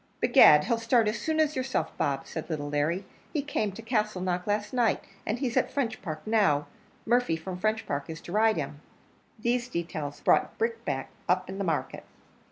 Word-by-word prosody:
"Begad! 150 0 +7
he'll 230 +6 0
start 230 -1 +3
as 215 - -1
soon 315 0 -1
as 310 -1 +2
yourself, 255 -11 -2
Bob," 140 -1 -1
said 160 - -6
little 145 -3 -3
Larry; 155 +6 0 0.3
"he 295 -3 0
came 220 -8 -1
to 230 - -9
Castleknock 200 -6 -1
last 210 +3 -1
night, 240 -4 +2 0.2
and 220 - 0
he's 245 -2 -2
at - - +2
Frenchpark 220 - -3
now: 200 -10 +3 0.4
Murphy 240 -6 +2
from 180 +3 -6
Frenchpark 215 -9 -1
is 160 -1 -6
to - - -9
ride 220 0 +3
him." 145 -1 -4 0.6
These 240 +2 0
details 165 - -4
brought - - +2
Brickbat 145 - -2 0.2
up 185 +1 +2
in 195 +1 -6
the - - 0
market. 165 -5 -2
205 Hz, 175 wpm, -28 LUFS, 160-230 Hz, 0.6 s, Begad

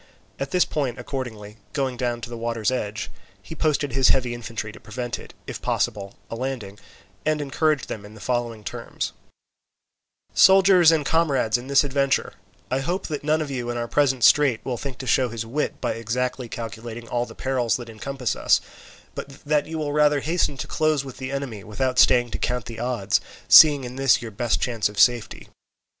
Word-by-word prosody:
At 135 - -3
this 180 +3 +3
point, 135 -5 -2
accordingly, 110 -6 -6 0.2
going 135 -3 -1
down 120 -1 -2
to 120 - -6
the - - -5
water's 115 -1 -1
edge, 105 -4 -3 0.3
he - - -10
posted 150 -3 0
his 130 +1 +3
heavy 125 -2 +2
infantry 115 -2 -5
to - - -13
prevent, 120 +2 -5 0.3
if - - -7
possible, 100 -1 -1
a - - -6
landing, 115 -5 -5 0.4
and 155 0 +1
encouraged 150 +1 0
them 105 - -6
in 105 +1 -12
the - - -12
following 120 -2 -2
terms: 100 - -5 1.2
"Soldiers 190 -3 +7
and 155 -3 +1
comrades 140 -7 +2
in 125 +1 -2
this 140 +1 +4
adventure, 140 -1 0 0.4
I 130 - +1
hope 175 +7 -2
that 150 -2 -4
none 155 +1 +2
of 145 - -7
you 125 -3 -3
in 120 - -2
our 120 0 -2
present 135 -2 +1
strait 140 -6 +5
will 125 - -2
think 135 +1 -6
to 130 - -7
show 130 -1 +2
his 115 -1 -5
wit 140 +7 -2
by 120 - -1
exactly 125 +2 -3
calculating 115 +1 -7
all 120 +1 -1
the - - -12
perils 130 -3 0
that 120 -2 -9
encompass 125 +2 -3
us, - - +3 0.5
but - - -6 0.2
that 150 0 +1
you 160 0 -5
will 150 -2 -2
rather 150 -1 +3
hasten 160 -3 0
to - - -4
close 155 -3 0
with 135 - -9
the 130 0 -5
enemy, 135 -7 -4
without 125 +5 -1
staying 120 -2 +5
to - - -4
count 125 -3 -1
the 115 -1 -8
odds, 120 -5 0 0.3
seeing 145 -3 +8
in 125 +1 -7
this 135 -1 +4
your 115 -2 -7
best 115 +3 0
chance 115 -4 0
of 105 -1 -7
safety. 120 -3 +2
125 Hz, 195 wpm, -24 LUFS, 115-140 Hz, 1.2 s, seeing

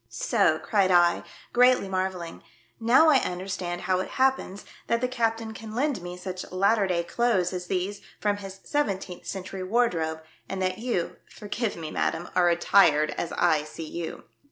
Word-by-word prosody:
" - - -41 0.2
So!" - - +4
cried 200 -4 +1
I, 175 -1 +4 0.3
greatly 250 -3 +5
marvelling. 185 -3 -3 0.2
" 115 - -36
Now 245 +8 +5
I 290 - +6
understand 180 -3 -3
how 185 -1 +1
it 185 - -3
happens 260 -7 +1 0.2
that 230 - +2
the 250 - 0
captain 225 -3 -1
can 220 0 -9
lend 265 -5 0
me 175 0 -7
such 185 0 -6
latter 200 +2 +2
day 175 -2 0
clothes 190 -3 +1
as 180 -1 -5
these 195 +2 -2 0.2
from 205 -1 0
his 195 -1 -9
seventeenth 195 -10 -2
century 190 0 -5
wardrobe, 180 -7 0 0.3
and 195 - -3
that 185 +1 -1
you 230 -8 -2
— - - -32
forgive 210 +1 -3
me, 160 -2 -6
madam 170 +2 -1
— - - -23
are 175 -1 +4
attired 170 -3 +4
as 170 - -4
I 160 -4 +2
see 155 +1 -8
you." 170 +1 -6
190 Hz, 180 wpm, -26 LUFS, 175-225 Hz, 0.3 s, I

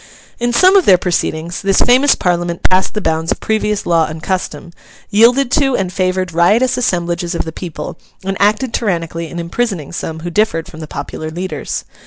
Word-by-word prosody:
In 240 0 0
some 370 +11 +5
of 385 - +5
their 185 - +7
proceedings, 170 -1 -2
this 195 -1 +1
famous 260 +3 +5
Parliament 175 -1 -1
passed 185 +3 +1
the 210 - -1
bounds 160 -1 0
of - - -1
previous 210 -1 -1
law 165 -2 +2
and 155 0 -8
custom, 170 -3 -3 0.4
yielded 240 +5 +4
to 275 -3 +2
and 185 -1 -2
favoured 185 -1 -1
riotous 215 +10 +3
assemblages 175 -6 -1
of - - -2
the 160 - -5
people, 170 0 -7 0.3
and 195 0 -1
acted 215 +5 +2
tyrannically 170 -5 -2
in 175 - -8
imprisoning 170 - -2
some 160 -2 -5
who 175 +1 -5
differed 170 -4 0
from 165 -4 -11
the 155 - -7
popular 150 +2 -6
leaders. 180 +4 -4
185 Hz, 185 wpm, -16 LUFS, 170-215 Hz, 0.4 s, their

